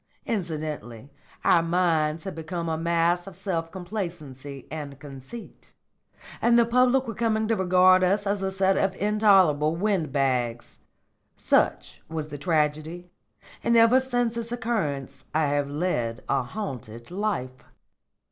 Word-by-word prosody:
Incidentally 150 - -4 0.3
our 170 - +5
minds 165 -2 +1
had 190 -1 -5
become 165 +1 -5
a 160 - 0
mass 170 +2 +1
of 195 - -9
self 165 -4 -3
complacency 160 - -6
and 145 -3 -6
conceit, 140 - -11 0.7
and 235 0 +4
the 235 - +5
public 250 +2 +3
were 225 - -3
coming 220 0 0
to 225 - +2
regard 185 -1 +5
us 200 +3 +2
as 200 0 -1
a 190 - 0
set 190 0 +2
of 190 -1 +1
intolerable 190 -8 +3
wind 185 -5 0
bags. 125 -4 -1 0.6
Such - - +1
was 155 -1 -4
the 145 -1 -7
tragedy, 160 +2 -1 0.5
and 235 0 +3
ever 230 +3 +6
since 245 -3 0
its 230 0 -5
occurrence 215 - -3
I 155 0 +3
have 145 0 0
led 135 -7 -2
a - - +1
haunted 125 - -7
life." 180 -11 -3
170 Hz, 140 wpm, -26 LUFS, 150-205 Hz, 0.7 s, ever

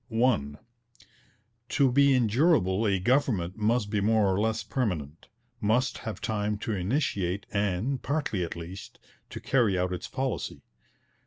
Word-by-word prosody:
(1) 110 - +1 1.1
To 135 -2 +3
be 140 +1 +5
endurable 115 - +2
a 100 -1 +2
government 95 -4 +1
must 110 -1 0
be 105 -2 +1
more 105 -2 +3
or 95 - 0
less 110 +1 0
permanent, 85 - -3 0.3
must 115 +4 +1
have 110 -5 -6
time 105 -1 -1
to 110 - -4
initiate 100 - -1
and, 105 +6 0
partly 140 - -1
at 85 - -5
least, 85 +3 -9 0.3
to - - -7
carry 115 -8 +2
out 90 0 0
its 90 - -5
policy. 130 -3 -3
105 Hz, 140 wpm, -28 LUFS, 95-125 Hz, 1.1 s, be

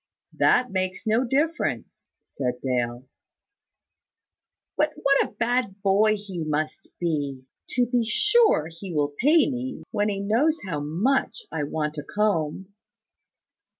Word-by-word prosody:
"That 250 0 +3
makes 185 +2 -2
no 220 +3 +2
difference," 295 +7 -1 0.2
said 125 -2 -4
Dale. 125 -1 -2 1.7
"But - - +1
what 275 0 +3
a - - -23
bad 235 -4 -1
boy 210 +2 +4
he 195 -5 -5
must 155 0 -2
be! 145 -6 -2 0.3
To 245 0 +3
be 240 0 +1
sure, 420 - +3
he 170 +3 -8
will 145 -1 0
pay 305 +3 +5
me, 260 -1 -4
when 205 +1 +1
he 200 -1 -2
knows 245 +11 +2
how 165 -6 -3
much 205 - 0
I 150 - -2
want 150 0 -3
a - - -6
comb." 190 -2 -1
200 Hz, 130 wpm, -25 LUFS, 155-250 Hz, 1.7 s, pay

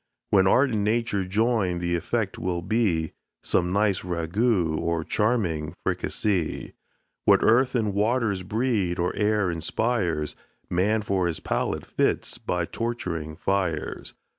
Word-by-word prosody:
When 95 -2 +5
art 130 +6 +4
and 105 -2 0
nature 110 -2 0
join, 105 -2 +1
the 85 0 -1
effect 85 - -2
will 85 -1 -2
be, 90 -8 0 0.3
Some 90 0 +1
nice 100 -1 +2
ragout, 90 0 0
or 85 -1 -1
charming 90 -7 0
fricasee. 95 -7 -1 0.5
What - - +5
earth 125 +4 +4
and 110 -4 +1
waters 105 -1 +1
breed, 105 -3 0
or 90 +1 -1
air 105 -3 +1
inspires, 85 -2 -1 0.4
Man 105 +5 +2
for 95 -3 +1
his 85 - -3
palate - - -2
fits - - -1
by 90 -1 -1
torturing 85 -9 -4
fires. 90 -3 -2
95 Hz, 130 wpm, -25 LUFS, 85-110 Hz, 0.5 s, When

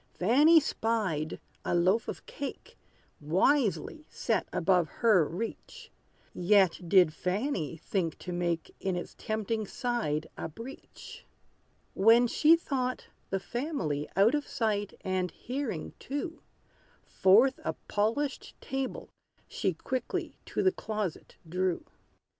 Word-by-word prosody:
Fanny 290 - +6
spied, 210 - -1 0.2
a - - 0
loaf 185 +6 +3
of - - -6
cake, 280 - -7 0.4
Wisely 220 - +1
set - - -1
above 180 -2 +2
her 215 -8 +4
reach; 230 - -6 0.4
Yet 190 -1 +3
did 180 -5 +6
Fanny 180 - -2
think 170 -1 -2
to 180 - -7
make 175 -2 -2
In 190 -2 -1
its 175 - -5
tempting 220 -1 -2
side 220 - -1
a - - -5
breach. 230 - -11 0.7
When 225 +5 +6
she 305 +7 +5
thought 255 -6 -2 0.2
the 195 - 0
family 190 - -3
Out 200 +7 +5
of 295 -1 -1
sight 210 -5 -1
and 185 -1 -1
hearing 245 - -4
too, 305 +5 -5 0.6
Forth 225 +8 +4
a - - -1
polished 230 +8 -1
table 270 -1 -4 0.4
she 190 - -1
Quickly 255 +8 -3
to - - -1
the 375 - +5
closet 215 - -4
drew. 180 +1 -1
210 Hz, 120 wpm, -30 LUFS, 180-260 Hz, 0.7 s, Fanny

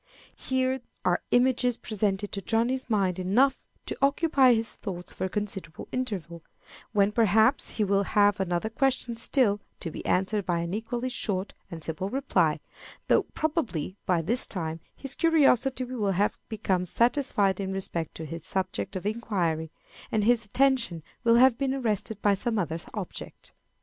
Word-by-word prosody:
Here 260 0 -1 0.2
are 180 -1 +2
images 245 -1 +3
presented 205 -1 -1
to 195 - -3
Johnny's 240 +5 0
mind 190 -4 +1
enough 240 +9 +2 0.2
to - - -3
occupy 275 -3 +4
his 225 0 -2
thoughts 180 -4 -6
for - - -3
a - - -2
considerable 195 -5 -5
interval, 190 -10 -4 0.5
when 205 -1 +3
perhaps 220 +4 +3
he 215 - +1
will 200 0 +2
have 205 0 +3
another 185 +3 -1
question 250 -1 0
still, 230 -3 +2 0.2
to 165 - -5
be - - -7
answered 195 +3 +1
by 175 -2 0
an 170 +1 -4
equally 240 +4 -3
short 200 -5 -2 0.2
and 165 -3 -7
simple 165 +5 -3
reply; 270 +5 +1 0.5
though, - - +5
probably, 240 - -1
by 175 -3 +2
this 235 +10 +1
time 165 -4 -3 0.2
his 275 -1 -7
curiosity 270 -6 +3
will 235 -6 -1
have 200 +3 0
become 190 -4 -1
satisfied 230 - +2
in 190 -1 -2
respect 190 -4 -3
to 160 - -6
his 165 +1 -6
subject 190 +2 -1
of 185 - -4
inquiry, 180 -8 -1 0.4
and 215 -2 +1
his 230 0 +3
attention 235 - +1 0.2
will 230 -1 +5
have 250 0 +5
been 270 -1 0
arrested 220 -4 -2
by 205 - +5
some 225 +3 -1
other 165 -4 -1 0.2
object. 200 -4 -8
210 Hz, 160 wpm, -27 LUFS, 185-245 Hz, 0.5 s, though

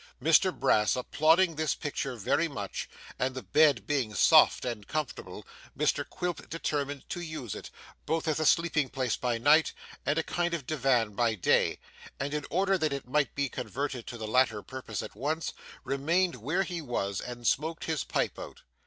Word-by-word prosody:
Mr 165 +7 +4
Brass 105 - +2
applauding 160 +7 +3
this 155 -1 0
picture 135 -3 -3
very 120 +9 +1
much, 105 -10 -5 0.3
and 130 +1 0
the 130 - -5
bed 150 -5 +4
being 130 -8 -1
soft - - +6
and 115 -5 -4
comfortable, 155 -5 -4 0.3
Mr - - +1
Quilp 180 -1 -4
determined 145 -4 -3
to 175 - -4
use 155 - -5
it, - - -8 0.4
both 160 0 -1
as 155 0 +1
a 155 - 0
sleeping 155 -5 +2
place 130 -2 -1
by 120 -2 -1
night 150 +6 +4 0.3
and 145 +3 0
as - - +3
a - - -25
kind 175 0 -1
of 150 -6 -6
Divan 125 -7 +1
by 115 +1 +1
day; 95 - +2 0.4
and 140 +1 -2
in 150 -1 -3
order 195 +1 +2
that 155 -3 0
it 140 -3 -5
might 145 +1 +1
be 140 0 0
converted 125 +1 -4
to 120 - -6
the 110 - -5
latter 110 -2 +2
purpose 130 -5 -6
at - - -8
once, 150 +8 -2 0.3
remained 170 +7 +1
where 155 - -1
he 175 -3 -4
was, 100 -8 -2
and 120 -1 -8
smoked 160 +7 0
his 160 -3 -1
pipe - - -1
out. - - -9
140 Hz, 185 wpm, -29 LUFS, 125-160 Hz, 0.4 s, soft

